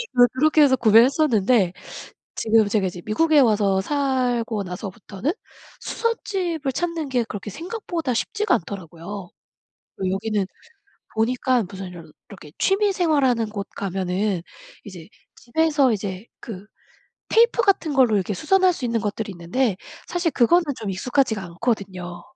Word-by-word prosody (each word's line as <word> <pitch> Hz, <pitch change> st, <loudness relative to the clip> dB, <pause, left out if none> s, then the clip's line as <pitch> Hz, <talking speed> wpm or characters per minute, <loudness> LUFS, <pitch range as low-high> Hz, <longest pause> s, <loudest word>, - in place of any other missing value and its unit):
그 245 Hz, 0 st, +7 dB
그렇게 305 Hz, +4 st, +3 dB
해서 265 Hz, -2 st, +5 dB
구매했었는데 230 Hz, -, +4 dB, 0.6 s
지금 220 Hz, -1 st, +3 dB
제가 200 Hz, -2 st, +1 dB
이제 175 Hz, -1 st, -7 dB
미국에 305 Hz, +8 st, +3 dB
와서 205 Hz, -6 st, +3 dB
살고 250 Hz, -5 st, 0 dB
나서부터는 195 Hz, -, -5 dB, 0.5 s
수선집을 360 Hz, -, -2 dB
찾는 335 Hz, -3 st, -2 dB
게 245 Hz, -2 st, +1 dB
그렇게 210 Hz, -1 st, -7 dB
생각보다 340 Hz, -, -4 dB
쉽지가 420 Hz, -, 0 dB
않더라고요. 180 Hz, +1 st, -7 dB, 0.7 s
그 190 Hz, -1 st, -1 dB
여기는 205 Hz, 0 st, -1 dB, 0.7 s
보니까 245 Hz, +2 st, +1 dB
무슨 195 Hz, -1 st, -7 dB
이렇 175 Hz, -2 st, -10 dB, 0.3 s
이렇게 155 Hz, -7 st, -12 dB
취미 395 Hz, +1 st, +2 dB
생활하는 275 Hz, -, +2 dB
곳 200 Hz, -2 st, -5 dB
가면은 190 Hz, -1 st, -1 dB, 0.4 s
이제 180 Hz, -5 st, -10 dB, 0.3 s
집에서 290 Hz, 0 st, +2 dB
이제 200 Hz, +1 st, -4 dB
그 205 Hz, -3 st, -8 dB, 0.6 s
테이프 465 Hz, +1 st, +4 dB
같은 375 Hz, -8 st, +2 dB
걸로 250 Hz, -5 st, +4 dB
이렇게 200 Hz, +1 st, 0 dB
수선할 370 Hz, -, +3 dB
수 260 Hz, -, -5 dB
있는 230 Hz, -1 st, 0 dB
것들이 210 Hz, 0 st, -3 dB
있는데 185 Hz, +5 st, -1 dB, 0.3 s
사실 350 Hz, -2 st, -1 dB
그거는 340 Hz, +9 st, +4 dB, 0.2 s
좀 215 Hz, -, -4 dB
익숙하지가 220 Hz, +1 st, 0 dB
않거든요. 180 Hz, -2 st, -4 dB
225 Hz, 325 characters per minute, -23 LUFS, 195-290 Hz, 0.7 s, 그